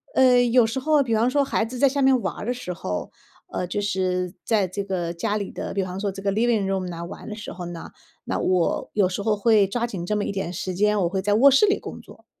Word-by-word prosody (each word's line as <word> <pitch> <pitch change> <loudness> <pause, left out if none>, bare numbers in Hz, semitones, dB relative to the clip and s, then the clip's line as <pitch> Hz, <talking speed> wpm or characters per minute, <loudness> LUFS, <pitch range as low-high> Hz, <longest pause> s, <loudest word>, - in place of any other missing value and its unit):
呃， 255 -1 +6
有 245 -1 +4
时 235 +4 -2
候 295 +1 +3
比 230 - -2
方 230 +3 +2
说 285 +2 +2
孩 225 - 0
子 250 +3 -7
在 275 0 +5
下 280 +1 -1
面 265 -1 +4
玩 195 - -2
儿 - - -7
的 245 - 0
时 245 -7 -6
候， 90 - -5 0.4
呃， 180 - -2
就 205 +3 -2
是 185 -2 -1
在 210 -5 +2
这 200 +3 -4
个 180 -3 -3
家 210 +5 -1
里 200 - -4
的 - - -5
比 195 - 0
方 185 0 -5
说 200 0 -1
这 195 +1 -8
个 195 0 0
Living 220 -1 +1
room 190 -1 -1
呐 170 -1 -6
玩 170 - -9
的 210 - -5
时 210 - -8
候 180 -1 -7
呢， 170 -1 -8 0.3
那 - - -2
我 180 -2 0
有 195 -3 +2
时 195 +2 -4
候 215 0 +2
会 210 -2 +4
抓 235 +4 -1
紧 180 -6 -5
这 210 - -1
么 205 - -1
一 - - -2
点 190 -3 -4
时 185 0 -4
间， 210 +2 +2
我 170 - +1
会 190 0 -2
在 205 +1 +2
卧 275 +6 +7
室 275 +11 +5
里 400 - +2
工 - - -8
作。 - - -17
205 Hz, 335 characters per minute, -24 LUFS, 185-235 Hz, 0.4 s, 卧